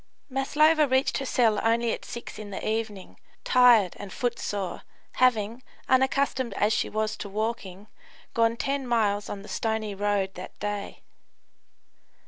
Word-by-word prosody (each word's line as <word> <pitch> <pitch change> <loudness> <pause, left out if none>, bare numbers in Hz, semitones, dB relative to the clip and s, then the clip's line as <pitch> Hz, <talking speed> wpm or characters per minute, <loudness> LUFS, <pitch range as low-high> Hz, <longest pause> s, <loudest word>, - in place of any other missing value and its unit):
Maslova 300 +3 +3
reached 260 +1 +1
her 270 - -4
cell 225 -5 +3
only 230 +1 +2
at - - -6
six 235 - -8
in 210 -1 -7
the 195 - -5
evening, 215 -3 -3 0.2
tired 240 -7 +5
and 200 -2 -7
footsore, 205 -5 -3 0.4
having, 235 -2 +2 0.3
unaccustomed 260 -3 +1
as 210 +2 +2
she - - 0
was 215 0 -1
to 200 - -7
walking, 205 -2 -4 0.5
gone 230 0 +2
10 275 +1 -2
miles 210 -4 +1
on 200 -1 -6
the - - -11
stony 220 -2 -2
road 200 -1 0
that 180 - -9
day. 205 -1 -5
220 Hz, 140 wpm, -27 LUFS, 205-250 Hz, 0.5 s, tired